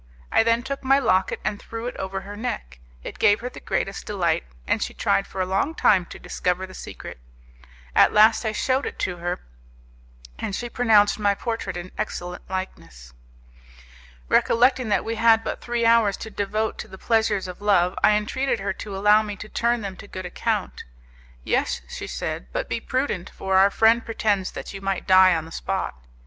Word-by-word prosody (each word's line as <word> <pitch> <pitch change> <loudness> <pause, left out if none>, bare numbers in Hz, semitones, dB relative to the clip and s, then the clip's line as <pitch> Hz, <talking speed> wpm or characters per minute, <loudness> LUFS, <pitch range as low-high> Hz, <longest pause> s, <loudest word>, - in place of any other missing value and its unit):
I - - +5
then 230 +1 +2
took 275 +2 -5
my 270 +1 +4
locket 190 -8 +1
and 205 - -2
threw 225 +1 -7
it 245 - -4
over 190 0 -4
her 205 +2 -9
neck; 65 - -5 0.2
it - - -8
gave 205 +2 +4
her 250 - -4
the - - -11
greatest 195 - -3
delight, 175 -6 0 0.2
and - - 0
she - - -3
tried 195 - +1
for 190 - -4
a - - +1
long 195 +12 0
time 185 - +3
to - - -10
discover 180 +1 -2
the 185 - -13
secret. - - -9 0.8
At - - +6
last 215 +2 +5
I 220 - 0
showed 260 +5 0
it - - -7
her, 175 -1 -3 1.0
and 195 - -3
she 240 +2 -4
pronounced 215 -4 +4
my 205 -1 +2
portrait 225 -5 -4
an 175 +1 -7
excellent 180 0 -5
likeness. 80 - -7 1.1
Recollecting 250 - +3
that - - +1
we 225 0 -3
had 225 0 +5
but - - -4
three 240 -1 -1
hours 230 -4 +4
to 220 - -8
devote 215 +2 -2
to - - -6
the 190 - -11
pleasures 220 -3 +1
of 180 +2 -9
love, 190 -3 +3
I - - +6
entreated 230 +4 0
her 195 0 -2
to 195 0 -7
allow 210 +2 +5
me 210 -1 -5
to 210 +2 -10
turn 235 +1 0
them 195 -2 -5
to - - -11
good 185 -2 -7
account. 180 - -2 0.6
"Yes," - - 0
she - - -7
said, 60 - -4
"but - - -3
be - - -2
prudent, 255 -9 -2
for 190 0 -2
our 195 +1 +6
friend 225 +3 +4
pretends 205 -4 -1
that - - -7
you 195 - -7
might 195 -1 -2
die 185 -1 +6
on 160 -1 -3
the 165 - -12
spot." 190 +3 -3
205 Hz, 195 wpm, -24 LUFS, 185-225 Hz, 1.1 s, At